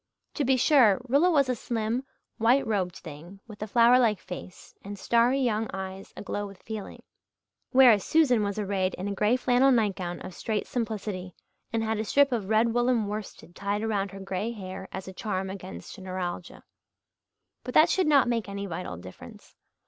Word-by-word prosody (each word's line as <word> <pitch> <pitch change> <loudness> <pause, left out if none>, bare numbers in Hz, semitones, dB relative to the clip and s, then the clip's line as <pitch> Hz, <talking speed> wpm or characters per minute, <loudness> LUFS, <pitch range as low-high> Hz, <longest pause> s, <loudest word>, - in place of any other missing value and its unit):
To 290 - -1
be 265 0 +3
sure, 250 -7 +5
Rilla 285 +8 +4
was 285 -6 +3
a 255 - +1
slim, 230 +1 -2 0.4
white 245 +5 +3
robed 190 -5 -1
thing, 170 +5 -11
with 215 -2 -13
a 215 - -3
flower 235 +3 +5
like 220 -5 +2
face 180 0 -10
and 200 +1 -7
starry 235 +6 +2
young 225 -4 0
eyes 190 0 -7
aglow 205 0 -4
with 195 -2 -14
feeling; 220 -2 -7 0.7
whereas 250 -6 +6
Susan 280 -8 +3
was 200 0 -2
arrayed 195 -2 -1
in 185 - -5
a 200 - -2
grey 210 +4 +2
flannel 255 +1 +3
nightgown 195 -7 0
of 185 - -8
strait 215 +3 -3
simplicity, 210 -6 -4 0.4
and 225 -1 0
had 220 -1 -1
a - - 0
strip 280 +5 +3
of 215 -5 -2
red 225 +1 +3
woollen 240 -2 +2
worsted 205 -3 -7
tied 200 +2 -2
around 205 -3 -1
her 195 +1 -10
grey 195 +3 -3
hair 190 -3 -7
as 190 - -7
a 190 - -7
charm 190 -1 -3
against 135 - -9
neuralgia. 185 -2 -5 1.0
But 250 - -7
that 310 - +7
should 370 -4 +2
not 280 -4 +5
make 230 -3 -1
any 200 0 -4
vital 180 - -5
difference. 90 +1 -13
210 Hz, 180 wpm, -27 LUFS, 190-240 Hz, 1.0 s, that